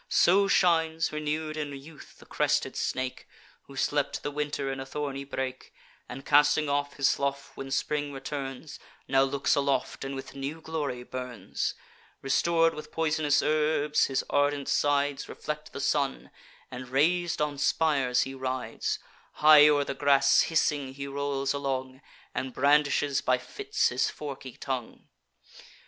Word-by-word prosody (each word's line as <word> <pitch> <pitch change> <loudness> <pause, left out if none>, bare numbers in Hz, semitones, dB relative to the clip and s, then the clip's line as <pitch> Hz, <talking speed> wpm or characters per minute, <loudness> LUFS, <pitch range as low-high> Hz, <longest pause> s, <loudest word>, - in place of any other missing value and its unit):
So 195 +3 +4
shines, 165 -4 +2
renew'd 155 +1 -2
in 150 -2 -3
youth, 150 +2 -14
the - - -16
crested - - 0
snake, 130 0 -3 0.4
Who 140 - -12
slept 145 +1 -1
the 145 - -2
winter 145 -2 -2
in 135 - -5
a 135 - -5
thorny 140 -1 -4
brake, 130 -1 -5 0.4
And, 135 +2 -8
casting 150 +1 +4
off 145 0 -1
his 140 -1 +2
slough 140 0 -1
when 135 - -7
spring 145 +1 -1
returns, 135 +1 -6 0.3
Now 135 0 +3
looks 135 0 +1
aloft, 140 -2 0
and 135 0 -4
with 135 - -8
new 140 +3 -5
glory 150 -6 -4
burns; 125 -6 -4 0.5
Restor'd 165 +4 +3
with 150 0 -9
poisonous 155 -2 +1
herbs, 150 -1 +2
his 135 - -1
ardent 145 0 +1
sides 145 -1 +1
Reflect 150 0 -6
the - - -7
sun; 140 0 -1 0.4
and 125 0 -7
rais'd 170 +6 +1
on 150 -2 -1
spires 145 -4 +2
he 135 - -6
rides; 130 -3 -3 0.4
High 150 -1 +8
o'er 145 -1 +3
the 140 - -4
grass, 135 0 +4
hissing 145 -4 0
he 140 0 -5
rolls 140 0 -2
along, 130 -2 -3 0.3
And 130 -1 -4
brandishes 145 0 +3
by 130 0 +2
fits 415 - -1
his - - 0
forky 135 -3 -8
tongue. 130 -4 -5
140 Hz, 145 wpm, -28 LUFS, 135-150 Hz, 0.5 s, High